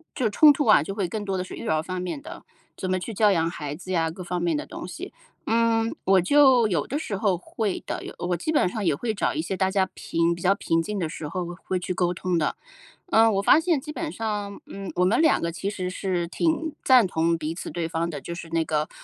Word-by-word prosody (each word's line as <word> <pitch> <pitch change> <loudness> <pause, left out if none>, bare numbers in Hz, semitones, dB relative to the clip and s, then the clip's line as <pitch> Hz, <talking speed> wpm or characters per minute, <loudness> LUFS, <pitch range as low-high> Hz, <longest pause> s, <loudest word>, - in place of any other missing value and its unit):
就 255 -5 +1
冲 295 +8 +7
突 290 0 0
啊， 215 -9 +6
就 195 +7 -5
会 200 -4 -1
更 210 +4 -4
多 195 -2 -2
的 180 - -1
是 185 - -10
育 - - -7
儿 155 0 +1
方 185 +1 -4
面 180 +9 -4
的， 280 - -10 0.3
怎 185 - -4
么 185 - +1
去 185 +5 -5
教 210 0 +4
养 165 -3 +2
孩 145 -4 -5
子 185 +3 -8
呀、 165 -3 +1
各 180 +3 -8
方 175 0 -3
面 170 -3 +1
的 - - -4
东 - - -8
西。 330 - -8 0.4
嗯， 230 0 +2
我 190 0 +5
就 260 +3 +5
有 180 -5 -1
的 280 - -2
时 215 - -4
候 195 -2 +1
会 200 +3 -3
的， - - -4
有 - - -7
我 175 0 -1
基 180 - -2
本 295 -11 +3
上 210 +3 -3
也 165 -5 +2
会 225 +7 -2
找 205 - 0
一 315 - 0
些 195 - -3
大 190 0 +1
家 190 -1 +2
平 170 +1 0
比 175 - -11
较 190 +2 +4
平 165 -4 0
静 210 +5 -4
的 170 - -1
时 155 -1 -6
候 180 +3 -3 0.2
会 185 - -1
去 180 - -3
沟 175 -1 +1
通 180 0 -1
的。 150 - -1 0.5
呃， 225 -8 +5
我 195 -2 +1
发 200 - +6
现 325 -2 +2
基 300 - -11
本 320 -1 -4
上， 210 -2 -4
嗯， 195 -1 -7
我 180 - +3
们 220 +10 +3
两 320 - +4
个 170 - -1
其 170 +4 -3
实 185 -3 -3
是 180 -2 -2
挺 320 - -1
赞 250 -6 +6
同 165 -1 +1
彼 160 +1 -4
此 - - -6
对 170 -2 -2
方 165 0 -2
的， 150 -4 -5
就 170 - -7
是 170 -1 -8
那 165 0 0
个， 155 0 -1
185 Hz, 285 characters per minute, -25 LUFS, 170-225 Hz, 0.5 s, 冲